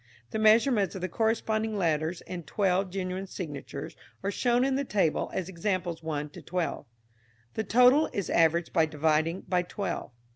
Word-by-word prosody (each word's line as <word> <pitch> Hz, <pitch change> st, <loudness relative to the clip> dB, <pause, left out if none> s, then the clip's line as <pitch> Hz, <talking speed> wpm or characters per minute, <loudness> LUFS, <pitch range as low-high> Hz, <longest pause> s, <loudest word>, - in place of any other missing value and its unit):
The 220 Hz, -, -2 dB
measurements 215 Hz, -1 st, +4 dB
of 190 Hz, -, -5 dB
the 185 Hz, -, -1 dB
corresponding 220 Hz, +1 st, 0 dB
letters 165 Hz, -1 st, 0 dB
in 180 Hz, -1 st, -6 dB
twelve 185 Hz, +4 st, 0 dB
genuine 185 Hz, 0 st, -4 dB
signatures 150 Hz, -8 st, -6 dB, 0.3 s
are 200 Hz, -, 0 dB
shown 245 Hz, +3 st, +2 dB
in 270 Hz, -, +1 dB
the 275 Hz, +1 st, 0 dB
table 195 Hz, -, 0 dB
as 185 Hz, -, -3 dB
Examples 175 Hz, -2 st, -2 dB
1 150 Hz, -2 st, -3 dB
to -, -, -11 dB
12. 175 Hz, -5 st, -3 dB, 0.7 s
The 220 Hz, -, -2 dB
total 250 Hz, +7 st, +5 dB
is 200 Hz, -, -2 dB
averaged 165 Hz, 0 st, +2 dB
by 160 Hz, -3 st, +4 dB
dividing 155 Hz, +3 st, +1 dB
by 180 Hz, -1 st, 0 dB
twelve. 195 Hz, -, -4 dB
185 Hz, 160 wpm, -28 LUFS, 165-215 Hz, 0.7 s, total